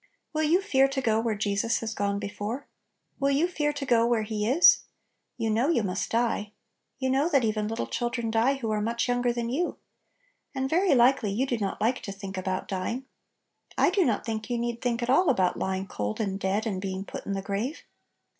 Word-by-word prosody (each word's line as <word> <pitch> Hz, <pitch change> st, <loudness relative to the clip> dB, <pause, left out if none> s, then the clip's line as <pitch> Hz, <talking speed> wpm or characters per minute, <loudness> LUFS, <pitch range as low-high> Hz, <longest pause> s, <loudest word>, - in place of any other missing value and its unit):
Will 310 Hz, -, 0 dB
you 325 Hz, +5 st, +3 dB
fear 270 Hz, -9 st, +4 dB
to 275 Hz, 0 st, -2 dB
go 225 Hz, -4 st, +2 dB
where 225 Hz, -1 st, 0 dB
Jesus 205 Hz, +2 st, 0 dB
has 225 Hz, -1 st, -3 dB
gone 200 Hz, -1 st, -1 dB
before? 210 Hz, +6 st, -4 dB, 0.5 s
Will 275 Hz, 0 st, +2 dB
you 285 Hz, +5 st, +3 dB
fear 295 Hz, -4 st, 0 dB
to 285 Hz, -1 st, -4 dB
go 235 Hz, -3 st, +4 dB
where 235 Hz, -2 st, +2 dB
He 210 Hz, -1 st, -2 dB
is? 310 Hz, +7 st, +7 dB, 0.6 s
You 225 Hz, -2 st, 0 dB
know 235 Hz, +7 st, +2 dB
you 275 Hz, -10 st, +2 dB
must 190 Hz, -1 st, -2 dB
die. 225 Hz, -3 st, 0 dB, 0.4 s
You 260 Hz, -1 st, 0 dB
know 280 Hz, +5 st, +2 dB
that 275 Hz, -6 st, +3 dB
even 215 Hz, -1 st, 0 dB
little 225 Hz, +1 st, -2 dB
chil 240 Hz, 0 st, -2 dB
dren 235 Hz, -2 st, -3 dB
die 230 Hz, +5 st, +3 dB
who 230 Hz, -5 st, -3 dB
are 210 Hz, -1 st, 0 dB
much 230 Hz, +3 st, -1 dB
younger 245 Hz, 0 st, +1 dB
than 235 Hz, 0 st, -3 dB
you. 340 Hz, +7 st, -1 dB, 0.8 s
And 265 Hz, 0 st, 0 dB
very 345 Hz, +2 st, +3 dB
likely 245 Hz, -3 st, +4 dB
you 235 Hz, +7 st, 0 dB
do 245 Hz, -3 st, -2 dB
not 200 Hz, -2 st, -2 dB
like 240 Hz, +4 st, +1 dB
to 200 Hz, -, -6 dB
think 195 Hz, 0 st, -7 dB
about 185 Hz, 0 st, -3 dB
dying. 205 Hz, +7 st, -3 dB, 0.7 s
I -, -, +4 dB
do 385 Hz, 0 st, +3 dB
not 230 Hz, -9 st, 0 dB
think 220 Hz, +1 st, -4 dB
you 240 Hz, -, 0 dB
need 235 Hz, 0 st, -3 dB
think 240 Hz, -1 st, -1 dB
at 240 Hz, -, -3 dB
all 350 Hz, +6 st, +4 dB
about 185 Hz, -8 st, +2 dB
lying 190 Hz, 0 st, -1 dB
cold 105 Hz, -, -4 dB
and 195 Hz, -2 st, -2 dB
dead 200 Hz, +3 st, 0 dB
and 195 Hz, -4 st, -2 dB
being 190 Hz, 0 st, -4 dB
put -, -, -8 dB
in 200 Hz, -, -1 dB
the 195 Hz, 0 st, -3 dB
grave. 210 Hz, +10 st, -3 dB
230 Hz, 220 wpm, -27 LUFS, 205-265 Hz, 0.8 s, is